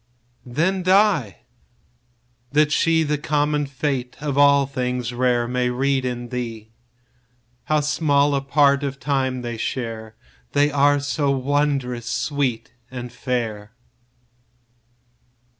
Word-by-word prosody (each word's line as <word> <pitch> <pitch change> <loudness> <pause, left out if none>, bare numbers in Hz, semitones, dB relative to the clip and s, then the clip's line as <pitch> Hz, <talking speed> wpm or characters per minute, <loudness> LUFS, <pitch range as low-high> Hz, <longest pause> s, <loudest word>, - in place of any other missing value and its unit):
15 120 - -12
Then 185 +5 +1
die—that 125 - -1
she 160 +1 +3
The 150 -1 -1
common 150 -1 0
fate 135 -2 -3
of 145 -2 -3
all 140 0 +5
things 125 -2 -3
rare 120 -1 +1
May 125 0 0
read 135 +1 0
in 120 -1 -4
thee; 115 -3 -5 0.9
How 155 -1 +2
small 145 -1 +2
a 140 - +1
part 140 0 +3
of 140 -1 -4
time 130 -1 -1
they 120 -1 -4
share 110 -2 -4 0.4
That 145 +1 +3
are 145 0 +3
so 145 0 -1
wondrous 135 -3 0
sweet 125 -2 -2 0.2
and 125 -1 -7
fair! 115 -5 -3
135 Hz, 115 wpm, -22 LUFS, 120-145 Hz, 0.9 s, all